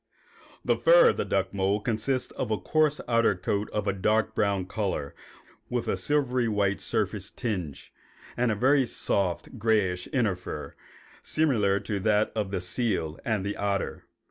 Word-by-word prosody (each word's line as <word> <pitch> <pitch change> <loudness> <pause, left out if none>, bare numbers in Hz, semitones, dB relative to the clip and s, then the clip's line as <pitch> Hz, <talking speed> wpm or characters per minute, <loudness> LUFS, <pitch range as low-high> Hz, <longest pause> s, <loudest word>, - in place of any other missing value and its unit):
The - - +2
fur - - +6
of - - -8
the - - -1
duck - - -1
mole 100 +1 +1
consists 120 +4 -1
of 125 - -4
a 110 - +1
coarse 155 +2 +1
outer 115 -3 +3
coat 100 +3 -2
of 105 -1 -2
a 100 - +1
dark 110 +3 +1
brown 100 -3 0
color 95 -8 -3 0.6
with 120 -1 -2
a - - +1
silvery 130 -5 +1
white 100 -2 0
surface 100 -1 -1
tinge, 95 - -5 0.4
and 120 -1 +1
a - - 0
very 130 +4 +3
soft, 95 -6 -2
grayish 95 -5 +1
inner 115 -8 +1
fur, 90 - -7 0.5
similar 110 -11 +2
to 100 0 -3
that 105 +1 +2
of 105 -3 -1
the 95 -2 -2
seal 90 -5 -1
and 110 -6 -1
the 100 - -2
otter. 100 -1 -2
105 Hz, 165 wpm, -27 LUFS, 100-120 Hz, 0.6 s, fur